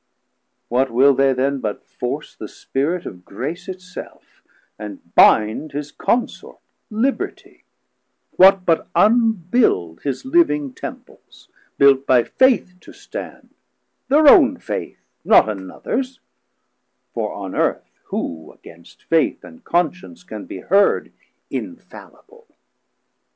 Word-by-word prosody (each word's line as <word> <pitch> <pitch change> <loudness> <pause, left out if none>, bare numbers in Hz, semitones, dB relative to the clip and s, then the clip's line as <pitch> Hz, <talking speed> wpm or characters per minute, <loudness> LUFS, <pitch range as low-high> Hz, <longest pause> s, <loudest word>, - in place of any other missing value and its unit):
What 130 +2 +1
will 135 +4 +4
they 135 +1 +3
then 135 +2 -1
But 105 -4 -5
force - - -5
the - - -8
Spirit 165 +7 -3
of 90 -1 -9
Grace 135 - -6
it 185 0 -7
self, 180 0 -12 0.4
and 105 -2 -8 0.2
binde 110 +8 +4
His 145 0 -5
consort 240 +1 -2 0.3
Libertie; 240 +5 -3 0.7
what, 190 0 +5
but 165 -2 +1
unbuild 205 - +2
His 140 - -4
living 150 - +1
Temples, - - -11 0.3
built 140 -1 +4
by 125 -2 +4
Faith 260 - +2
to - - -14
stand, - - -9 0.6
Thir 300 +2 +5
own 280 -3 +7
Faith - - -6 0.3
not - - +5
anothers: 110 - -4 0.9
for - - -3
on - - -7
Earth - - -1
Who 80 -1 -5
against 85 0 -17
Faith 165 -2 0
and 250 0 -14
Conscience 180 - -2
can 110 - -9
be 95 - -8
heard 200 +2 +2 0.4
Infallible? 470 -1 -10
155 Hz, 115 wpm, -20 LUFS, -, 0.9 s, own